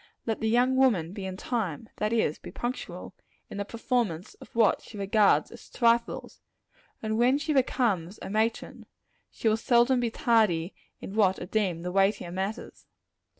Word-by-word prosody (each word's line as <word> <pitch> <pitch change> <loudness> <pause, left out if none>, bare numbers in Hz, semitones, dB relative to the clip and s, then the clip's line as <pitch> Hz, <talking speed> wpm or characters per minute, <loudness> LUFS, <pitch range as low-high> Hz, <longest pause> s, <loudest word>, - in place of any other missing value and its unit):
Let 225 -2 -2
the 220 - +1
young 250 +3 +3
woman 200 -11 +2
be 195 -2 -5
in 185 0 -6
time 220 - -3
that 210 +1 -1
is, 220 -10 +1
be - - -10
punctual 245 +2 -5 0.4
in - - -6
the 200 - -2
performance 225 -6 -2
of - - -12
what 225 -3 +3
she 215 - -12
regards 200 +1 +3
as - - -13
trifles, 235 -1 0 0.6
and 220 0 -1
when 250 +3 +4
she 305 +1 -2
becomes 220 - +1
a - - -5
matron, 220 +2 -2 0.4
she - - -3
will 220 0 +3
seldom 240 +2 +3
be 240 -1 0
tardy 220 - +2 0.3
in 195 - -7
what 195 -3 +3
are - - -5
deemed 180 -4 -1
the 180 - -2
weightier 195 -2 +1
matters. 195 +5 -5
220 Hz, 170 wpm, -28 LUFS, 190-235 Hz, 0.6 s, when